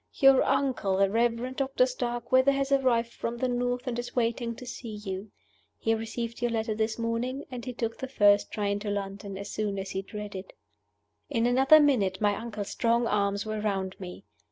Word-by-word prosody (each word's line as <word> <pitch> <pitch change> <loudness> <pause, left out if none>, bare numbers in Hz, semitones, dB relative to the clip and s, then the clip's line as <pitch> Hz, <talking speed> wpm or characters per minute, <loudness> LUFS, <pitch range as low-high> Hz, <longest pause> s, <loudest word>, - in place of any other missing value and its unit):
"Your 270 -1 +6
uncle, 260 -8 +1
the 195 0 +3
Reverend 235 +3 0
Doctor 270 -2 +2
Starkweather, 255 +1 +1
has 275 0 -1
arrived 240 -4 +2
from 235 +1 -4
the 255 - 0
North, 245 +1 -1
and 240 -2 -2
is 245 - -6
waiting 235 -1 0
to 250 - -10
see 235 -3 -7
you. 200 0 -6 0.5
He 225 - +1
received 230 +1 -4
your 240 - +1
letter 225 -1 -1
this 220 +1 -1
morning, 235 +4 -2
and 245 -2 -6
he 255 - -4
took 230 -1 -3
the 265 - -4
first 205 -4 +4
train 200 -1 -1
to 205 0 -4
London 200 -1 -4
as 200 - -6
soon 205 -2 -2
as 195 0 -4
he 190 - -2
had 195 - -19
read 210 -1 -5
it." 190 0 -8 0.8
In 230 - +1
another 265 +5 +6
minute 225 -11 +2
my 205 -1 +2
uncle's 215 -2 -5
strong 235 +1 +2
arms 200 -1 0
were 215 0 -3
round 195 -3 -1
me. 185 0 -8
230 Hz, 200 wpm, -28 LUFS, 205-250 Hz, 0.8 s, Your